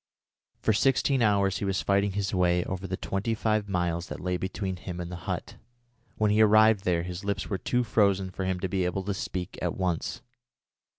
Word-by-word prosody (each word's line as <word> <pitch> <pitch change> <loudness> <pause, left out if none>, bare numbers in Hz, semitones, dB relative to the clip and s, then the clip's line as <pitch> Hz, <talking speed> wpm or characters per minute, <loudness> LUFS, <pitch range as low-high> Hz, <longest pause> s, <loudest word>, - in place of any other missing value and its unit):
For 110 - +1
sixteen 135 +3 +2
hours 100 -3 +2
he - - -2
was 95 -1 0
fighting 100 0 +2
his 100 0 -2
way 90 -1 +2
over 95 +1 -4
the 95 0 -3
twenty 105 +4 -2
five 110 -2 0
miles 85 -2 -1
that - - -6
lay 90 0 -1
between 95 +1 -3
him 90 0 -7
and 85 0 -5
the - - -4
hut. - - -4 0.6
When 105 -1 +2
he 105 +1 +4
arrived 110 -1 +5
there 85 -2 +1
his 90 +1 -6
lips 100 +1 -3
were 95 - -1
too 125 +7 0
frozen 100 -4 +2
for 95 - -4
him 95 -1 -1
to 95 - 0
be 95 0 0
able 90 +2 -1
to 100 +1 -2
speak 90 -1 -5
at 90 -2 -2
once. 90 -3 -2
95 Hz, 210 wpm, -28 LUFS, 90-105 Hz, 0.6 s, arrived